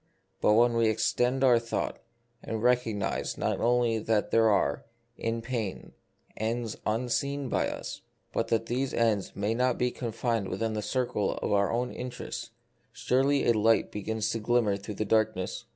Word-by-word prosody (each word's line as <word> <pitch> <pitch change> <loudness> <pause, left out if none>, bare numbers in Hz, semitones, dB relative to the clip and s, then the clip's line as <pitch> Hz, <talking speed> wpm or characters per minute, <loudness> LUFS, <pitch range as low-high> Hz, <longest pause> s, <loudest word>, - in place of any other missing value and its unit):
But 105 - +5
when 120 +2 +5
we 115 -1 +3
extend 125 +4 +1
our 125 -3 +6
thought, 115 0 -3 0.4
and 110 -1 -4
recognise 120 -5 0
not - - -1
only 120 -1 +2
that 110 -1 0
there 115 -1 +5
are, 70 -8 +1 0.3
in 115 0 -3
pain, 115 -5 -4 0.4
ends 115 0 -2
unseen 125 +5 -1
by - - +1
us, - - -6 0.3
but - - 0
that 115 0 +1
these 130 +3 -1
ends 110 -4 +1
may 105 +2 0
not 125 +1 +1
be 125 0 +1
con 120 -2 -4
fined 115 -3 -1
within 115 -1 -2
the 105 - -2
circle 105 -1 -1
of - - -3
our 100 0 +2
own 125 +2 -1
interests, 120 -1 -6 0.4
surely 135 +2 +1
a 120 - +5
light 110 +1 +3
begins 110 +2 -2
to 115 - -2
glimmer 110 -2 +2
through 100 +1 -7
the 110 - -2
darkness. 110 -4 0
115 Hz, 170 wpm, -29 LUFS, 110-120 Hz, 0.4 s, our